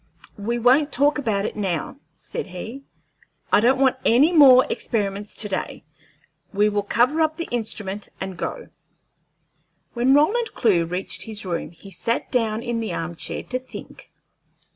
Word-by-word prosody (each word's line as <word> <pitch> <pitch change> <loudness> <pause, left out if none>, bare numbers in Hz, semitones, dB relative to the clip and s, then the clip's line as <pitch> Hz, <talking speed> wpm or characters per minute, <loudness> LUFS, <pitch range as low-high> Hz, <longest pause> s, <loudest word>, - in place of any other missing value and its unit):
"We 235 +4 -1
won't 260 +6 +4
talk 290 +1 +2
about 210 -7 -1
it - - -4
now," 185 -10 -2 0.2
said - - -6
he. 220 +9 -7 0.7
"I - - +7
don't 255 +4 +3
want 265 -1 +3
any 280 +9 +4
more 265 -5 +8
experiments 205 -2 -3
to 210 - -2
day. 190 -2 -4 0.7
We 210 +1 +2
will 205 0 0
cover 250 +9 +2
up 315 0 +1
the 335 - -4
instrument 210 -4 -3
and 190 -1 -5
go." 475 - -5 1.2
When 255 +3 +3
Roland 445 +11 +2
Clewe 180 -8 +3
reached 180 +3 -3
his 215 -3 -5
room, 170 -4 -3
he 175 +4 -15
sat 230 +6 -2
down 225 -3 0
in 240 -2 -2
the 225 - -3
arm 170 +1 -4
chair - - -5
to 255 - -3
think. 255 - -12
225 Hz, 160 wpm, -23 LUFS, 200-265 Hz, 1.2 s, more